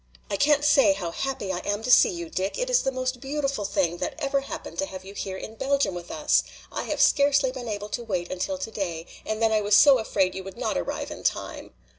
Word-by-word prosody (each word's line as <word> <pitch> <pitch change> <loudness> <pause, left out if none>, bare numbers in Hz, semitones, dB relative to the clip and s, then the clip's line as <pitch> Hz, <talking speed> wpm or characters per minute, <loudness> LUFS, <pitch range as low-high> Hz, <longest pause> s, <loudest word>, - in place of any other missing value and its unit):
"I - - +1
can't 295 +5 +3
say 275 -8 +5
how 180 -4 -4
happy 265 -4 -3
I 175 - -2
am 205 +3 -3
to 255 - 0
see - - +7
you, 170 -2 -5
Dick. 190 +1 -2
It - - -2
is - - +4
the 270 - 0
most 255 -1 -3
beautiful 275 -5 -2
thing 190 -4 0
that - - -3
ever 275 -2 0
happened 275 - -7
to 290 - 0
have 185 -5 -9
you 195 - -9
here 190 -2 -5
in 220 - -8
Belgium 270 -3 0
with 175 -1 -7
us! - - +2 0.3
I - - -4
have - - -3
scarcely 280 -2 +4
been 255 -2 -7
able 205 -1 -4
to 240 - -3
wait 185 -6 -3
until 235 +11 -2
today, 195 -10 -4 0.2
and 215 0 -2
then 225 -1 +3
I 215 -1 +3
was 205 0 +3
so 265 +4 +7
afraid 195 -4 0
you 190 - -6
would 195 +3 -10
not 230 -3 -2
arrive - - -3
in - - -8
time." - - -3
220 Hz, 245 wpm, -26 LUFS, 190-275 Hz, 0.3 s, see